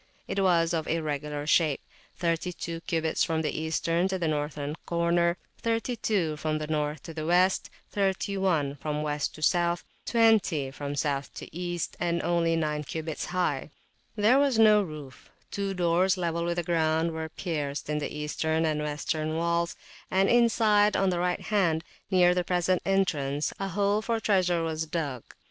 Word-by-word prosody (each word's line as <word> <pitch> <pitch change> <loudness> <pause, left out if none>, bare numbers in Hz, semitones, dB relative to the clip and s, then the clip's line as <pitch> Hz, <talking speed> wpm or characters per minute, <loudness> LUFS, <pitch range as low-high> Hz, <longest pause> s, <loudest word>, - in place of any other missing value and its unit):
It 195 - -2
was 175 -2 +3
of 160 -2 -1
irregular 150 -2 -2
shape; 155 -2 +3 0.4
32 170 -1 -2
cubits 160 -1 +1
from 160 -2 0
the 150 - 0
Eastern 165 +3 0
to 190 0 -1
the 170 -3 -1
Northern 150 -1 -2
corner; 170 0 +2 0.2
32 225 -8 0
from 155 0 -1
North 150 -1 -2
to 160 -1 -6
West; 180 +3 +2 0.2
31 190 -7 0
from 150 +1 -3
West 150 -1 -2
to 155 - -8
South; 175 +1 +2 0.2
20 215 - +3
from 145 +1 -5
South 140 -1 -1
to - - -9
East; 175 -1 -3
and 170 -1 0
only 170 -1 +2
9 150 -2 -1
cubits 160 +2 -4
high. 175 -6 -1 0.5
There 225 +5 +4
was 280 -4 +2
no 215 -1 +6
roof; 150 -7 -9 0.2
two 195 -1 -2
doors, 180 +2 +2
level 170 -1 -1
with 170 0 -1
the 175 - 0
ground, 160 0 +1
were 160 0 -4
pierced 150 -5 -3
in 150 0 -1
the 145 - -4
Eastern 160 +2 -1
and 155 -1 0
Western 155 +1 -2
walls; 170 +1 0 0.3
and 190 +1 +3
inside, 220 -3 +4
on 195 -1 +2
the 175 - -1
right 180 0 0
hand, 180 -7 +1 0.3
near 180 -2 +5
the 180 0 0
present 180 0 +1
entrance, 150 -7 0
a 195 - -2
hole 200 +3 +1
for 230 0 -1
treasure 180 -5 +2
was 160 0 -2
dug. 145 -7 -3
170 Hz, 160 wpm, -28 LUFS, 155-185 Hz, 0.5 s, no